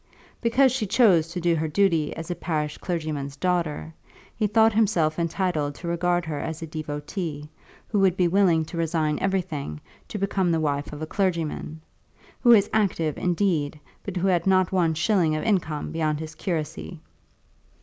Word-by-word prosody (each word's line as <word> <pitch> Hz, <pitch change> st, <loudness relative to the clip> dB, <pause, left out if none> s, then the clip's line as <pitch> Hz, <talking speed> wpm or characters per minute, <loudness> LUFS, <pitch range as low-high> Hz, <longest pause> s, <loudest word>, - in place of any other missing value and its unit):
Because 255 Hz, +3 st, +4 dB
she 240 Hz, -4 st, -1 dB
chose 185 Hz, -8 st, +4 dB
to 175 Hz, +2 st, -5 dB
do 170 Hz, 0 st, +2 dB
her 160 Hz, 0 st, -1 dB
duty 165 Hz, -3 st, +2 dB
as 165 Hz, +2 st, -6 dB
a -, -, -2 dB
parish 150 Hz, -4 st, -3 dB
clergyman's 155 Hz, -5 st, -3 dB
daughter, 165 Hz, -2 st, -1 dB, 0.4 s
he 215 Hz, -, +1 dB
thought 220 Hz, +1 st, +4 dB
himself 180 Hz, -8 st, +2 dB
entitled 165 Hz, -4 st, -1 dB
to 170 Hz, -, -8 dB
regard 175 Hz, 0 st, 0 dB
her 155 Hz, -3 st, -3 dB
as 160 Hz, 0 st, -4 dB
devotée, 150 Hz, 0 st, -5 dB, 0.4 s
who 210 Hz, -, 0 dB
would 190 Hz, -2 st, +3 dB
be 180 Hz, -, +3 dB
willing 170 Hz, -3 st, +3 dB
to 170 Hz, -, -8 dB
resign 160 Hz, -2 st, 0 dB
everything 175 Hz, -, -2 dB, 0.3 s
to -, -, -5 dB
become 195 Hz, -2 st, 0 dB
the 165 Hz, -, +1 dB
wife 145 Hz, -2 st, -1 dB
of 150 Hz, +1 st, -6 dB
a -, -, -1 dB
clergyman, 165 Hz, -3 st, -2 dB, 0.6 s
who 245 Hz, -, +3 dB
was 210 Hz, -4 st, +7 dB
active, 175 Hz, -8 st, +1 dB
indeed, 170 Hz, -5 st, 0 dB, 0.2 s
but 195 Hz, -2 st, -5 dB
who 185 Hz, +2 st, +1 dB
had 175 Hz, -1 st, +1 dB
not 185 Hz, -2 st, +3 dB
one 170 Hz, -4 st, +2 dB
shilling 165 Hz, -1 st, +2 dB
of 155 Hz, -, -2 dB
income 170 Hz, -8 st, -1 dB
beyond 155 Hz, -2 st, -1 dB
his 160 Hz, 0 st, -6 dB
curacy. 150 Hz, -, -4 dB
170 Hz, 170 wpm, -25 LUFS, 155-190 Hz, 0.6 s, was